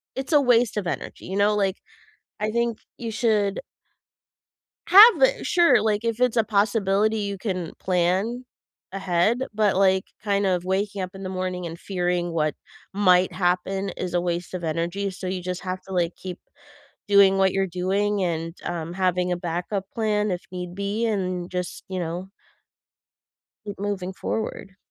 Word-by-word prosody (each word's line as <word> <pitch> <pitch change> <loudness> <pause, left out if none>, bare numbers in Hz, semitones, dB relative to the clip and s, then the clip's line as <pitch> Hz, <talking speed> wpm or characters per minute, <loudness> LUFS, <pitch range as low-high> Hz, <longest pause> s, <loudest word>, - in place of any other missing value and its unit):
it's 265 +4 -3
a 295 - +6
waste 245 -4 +3
of 195 -4 -2
energy, - - -5
you 190 - -5
know? 205 +1 +3
Like, 195 -2 0 0.6
I 215 0 0
think 235 0 0 0.2
you 230 -2 -4
should 210 -3 +1 1.3
have 425 +8 +9
a - - +4
sure, 335 -10 +4
like, 215 0 0
if 230 +1 -1
it's 250 -2 +2
a 225 - +4
possibility, 210 0 +1
you 200 -1 -3
can 185 -5 -3
plan 190 +7 0 0.5
ahead, 195 +3 +1 0.2
but, 210 -2 +2
like, 190 -1 +3 0.2
kind 200 -1 +1
of 180 -2 0
waking 195 +1 -1
up 185 - -4
in 195 - -9
the 185 - -4
morning, 185 -1 -3
and 165 0 -7
fearing 175 -2 -1
what 155 -3 0 0.4
might 185 -2 +4
happen 185 +2 0
is 180 -1 -4
a 175 - +3
waste 175 0 -3
of 180 - -4
energy, 170 +5 -2
so 185 0 -7
you 185 0 -3
just 180 0 -4
have 185 0 -4
to, 190 - -11
like, 175 -2 0
keep 185 -1 -7 0.7
doing 200 -1 +6
what 190 0 +3
you're 195 0 0
doing, 195 +3 0
and, 165 -1 -2
um, 170 -1 -4
having 180 -1 0
a 180 - 0
backup 175 +3 -3
plan 215 -2 0
if 180 0 -2
need 180 -1 -6
be, 200 +3 -1
and 185 -5 -2
just, 180 -1 -4
you 185 -1 -3
know 175 +3 -4 1.4
keep 205 -2 -7
moving 195 -2 -3
forward. 195 -2 -4
190 Hz, 170 wpm, -24 LUFS, 180-210 Hz, 1.4 s, have